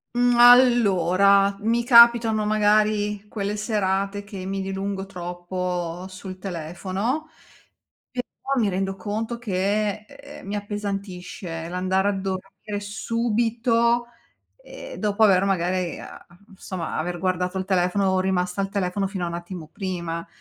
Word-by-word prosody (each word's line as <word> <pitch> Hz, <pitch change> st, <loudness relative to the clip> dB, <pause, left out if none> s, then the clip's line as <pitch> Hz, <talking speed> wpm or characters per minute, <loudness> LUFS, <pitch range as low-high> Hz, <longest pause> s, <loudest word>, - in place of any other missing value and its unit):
Mhmm, 245 Hz, 0 st, +3 dB
allora, 200 Hz, -6 st, +5 dB
mi 230 Hz, +2 st, +1 dB
capitano 235 Hz, -3 st, +6 dB
magari 210 Hz, -1 st, +2 dB
quelle 205 Hz, -1 st, -3 dB
serate 200 Hz, -2 st, -1 dB
che 195 Hz, -3 st, -8 dB
mi 195 Hz, 0 st, -3 dB
dilungo 195 Hz, 0 st, -4 dB
troppo 180 Hz, -1 st, -4 dB
sul 190 Hz, 0 st, -9 dB
telefono, 190 Hz, -, -3 dB, 0.8 s
e 250 Hz, -1 st, -3 dB, 0.2 s
poi 275 Hz, -3 st, 0 dB
mi 210 Hz, -, +2 dB
rendo 195 Hz, +1 st, -2 dB
conto 215 Hz, +5 st, -4 dB
che, 210 Hz, 0 st, -1 dB
ehm, 280 Hz, -5 st, -12 dB
mi 205 Hz, -, -3 dB
appesantisce 195 Hz, -5 st, -5 dB
l'andare 185 Hz, +2 st, 0 dB
a 205 Hz, -, +3 dB
dormire 195 Hz, +2 st, -5 dB
subito, 230 Hz, +2 st, 0 dB, 0.6 s
ehm, -, -, -10 dB
dopo 210 Hz, +1 st, +1 dB
aver 195 Hz, -2 st, +5 dB
magari 185 Hz, -2 st, 0 dB
a -, -, -11 dB
a 175 Hz, 0 st, -20 dB
insomma 185 Hz, -3 st, -6 dB
aver 175 Hz, +2 st, -2 dB
guardato 180 Hz, 0 st, -1 dB
il 190 Hz, -, -2 dB
telefono, 190 Hz, 0 st, +1 dB
rimasta 185 Hz, 0 st, 0 dB
al 195 Hz, -, -2 dB
telefono 195 Hz, 0 st, -1 dB
fino 190 Hz, -2 st, -4 dB
a -, -, -3 dB
un 170 Hz, -, -6 dB
attimo 175 Hz, -2 st, -7 dB
prima. 170 Hz, -4 st, -4 dB
195 Hz, 130 wpm, -24 LUFS, 185-215 Hz, 0.8 s, capitano